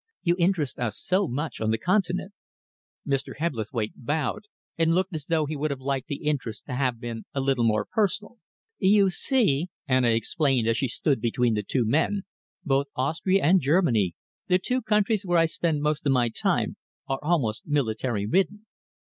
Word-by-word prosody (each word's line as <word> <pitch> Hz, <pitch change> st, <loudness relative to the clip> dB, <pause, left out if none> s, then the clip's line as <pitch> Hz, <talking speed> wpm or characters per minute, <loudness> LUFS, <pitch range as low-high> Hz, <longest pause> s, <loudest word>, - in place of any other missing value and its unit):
You 175 Hz, -1 st, +3 dB
interest 170 Hz, -6 st, +1 dB
us 120 Hz, -4 st, -2 dB
so 185 Hz, +1 st, +1 dB
much 145 Hz, +2 st, -4 dB
on 110 Hz, -, +1 dB
the 110 Hz, -, +2 dB
Continent." 185 Hz, -, 0 dB, 0.7 s
Mr. 135 Hz, -1 st, -2 dB
Hebblethwaite 115 Hz, -7 st, -2 dB
bowed 150 Hz, -, -2 dB, 0.3 s
and 165 Hz, 0 st, +2 dB
looked 190 Hz, +1 st, 0 dB
as 155 Hz, -2 st, -5 dB
though 160 Hz, -2 st, +2 dB
he 155 Hz, +1 st, -4 dB
would 150 Hz, +2 st, -1 dB
have 140 Hz, -2 st, -3 dB
liked 135 Hz, 0 st, -2 dB
the 145 Hz, 0 st, -5 dB
interest 145 Hz, -7 st, -2 dB
to 135 Hz, -, -6 dB
have 125 Hz, -2 st, 0 dB
been 115 Hz, -2 st, -6 dB
a -, -, 0 dB
little 135 Hz, -2 st, +1 dB
more 110 Hz, -2 st, +2 dB
personal. 210 Hz, +2 st, -1 dB, 0.4 s
"You 195 Hz, 0 st, +4 dB
see," 185 Hz, -, +1 dB, 0.2 s
Anna 130 Hz, -2 st, +3 dB
explained, 120 Hz, +1 st, +1 dB
as 115 Hz, +1 st, +2 dB
she 135 Hz, -, 0 dB
stood 130 Hz, +1 st, 0 dB
between 120 Hz, 0 st, +1 dB
the 105 Hz, -, 0 dB
two 120 Hz, +4 st, 0 dB
men, 160 Hz, -, +1 dB, 0.4 s
"both 140 Hz, -1 st, +1 dB
Austria 160 Hz, +8 st, +1 dB
and 180 Hz, +4 st, +5 dB
Germany, 135 Hz, -, +2 dB, 0.3 s
the 180 Hz, -, +4 dB
two 255 Hz, +7 st, -1 dB
countries 210 Hz, -1 st, +1 dB
where 175 Hz, -2 st, +1 dB
I 165 Hz, -, +5 dB
spend 160 Hz, -2 st, -1 dB
most 150 Hz, 0 st, 0 dB
of -, -, +4 dB
my 120 Hz, -2 st, +2 dB
time, -, -, 0 dB, 0.3 s
are 135 Hz, 0 st, -1 dB
almost 145 Hz, -9 st, 0 dB
military 120 Hz, -6 st, 0 dB
ridden. 195 Hz, -, 0 dB
145 Hz, 180 wpm, -26 LUFS, 125-180 Hz, 0.7 s, and